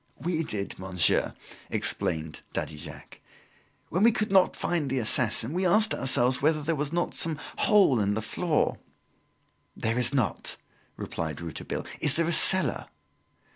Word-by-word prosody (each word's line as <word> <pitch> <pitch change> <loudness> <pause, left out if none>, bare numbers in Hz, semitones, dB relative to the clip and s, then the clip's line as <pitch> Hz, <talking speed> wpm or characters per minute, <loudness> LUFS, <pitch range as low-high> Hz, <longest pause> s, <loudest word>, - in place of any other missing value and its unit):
"We 165 +3 -1
did, 100 -12 -4
monsieur," 95 -2 0 0.3
explained 80 -1 -2
Daddy 75 - -4
Jacques. 75 - -11 0.7
"When 180 - -1
we 230 +2 +6
could 215 -3 -3
not 190 -2 +3
find 160 -5 -2
the 135 - -2
assassin, 115 +2 +2
we 185 +2 -1
asked 215 +5 +3
ourselves 130 0 +1
whether 155 +1 +1
there 165 +2 -1
was 150 0 -3
not 175 +1 -2
some 160 -2 +1 0.2
hole 195 - +4
in 100 0 0
the 110 - -2
floor 155 +8 -1 0.5
" - - -37
"There 115 +2 0
is 125 - +4
not," 130 -7 -2 0.4
replied 80 -3 -5
Rouletabille. 85 -2 -6
"Is 150 0 0
there 165 - +1
a 170 - 0
cellar?" 190 +3 +5
145 Hz, 155 wpm, -26 LUFS, 110-175 Hz, 0.7 s, we